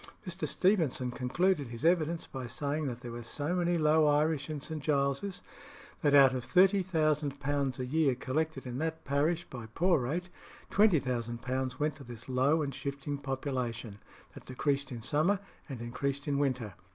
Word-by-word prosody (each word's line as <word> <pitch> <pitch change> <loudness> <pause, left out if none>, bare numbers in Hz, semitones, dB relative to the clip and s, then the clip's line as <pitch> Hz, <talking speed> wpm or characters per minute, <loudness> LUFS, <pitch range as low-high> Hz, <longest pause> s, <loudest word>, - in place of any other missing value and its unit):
Mr. 185 0 -3
Stevenson 160 -10 +1
concluded 145 +5 +1
his 115 +5 -6
evidence 170 -1 +2
by 130 -2 -6
saying 145 +5 -2
that 120 -2 -5
there 120 -2 -7
were 120 0 -6
so 145 +7 -2
many 175 -1 +1
low 155 0 +4
Irish 150 0 +2
in 155 -1 -3
St. 155 +1 -5
Giles's, 140 +6 0 0.6
that 145 -1 +4
out 135 -2 +8
of 130 -2 -2
£30,000 150 -8 +2
a 125 - -1
year 140 0 +2
collected 140 +2 -2
in 125 0 -4
that 160 +1 -3
parish 155 +5 +1
by 120 -5 -8
poor 170 +9 +2
rate, 165 +9 -2 0.4
£20,000 130 - +1
went 150 +1 0
to 140 - -10
this 120 -2 -10
low 135 +5 +2
and 140 -1 -3
shifting 140 0 -4
population, 130 -6 -3 0.3
that - - -13
decreased 140 +2 -1
in 115 -2 -6
summer 155 - +2 0.3
and 130 -4 -6
increased 140 +4 -3
in 140 -1 +1
winter. 130 -7 -1
140 Hz, 165 wpm, -31 LUFS, 130-160 Hz, 0.6 s, out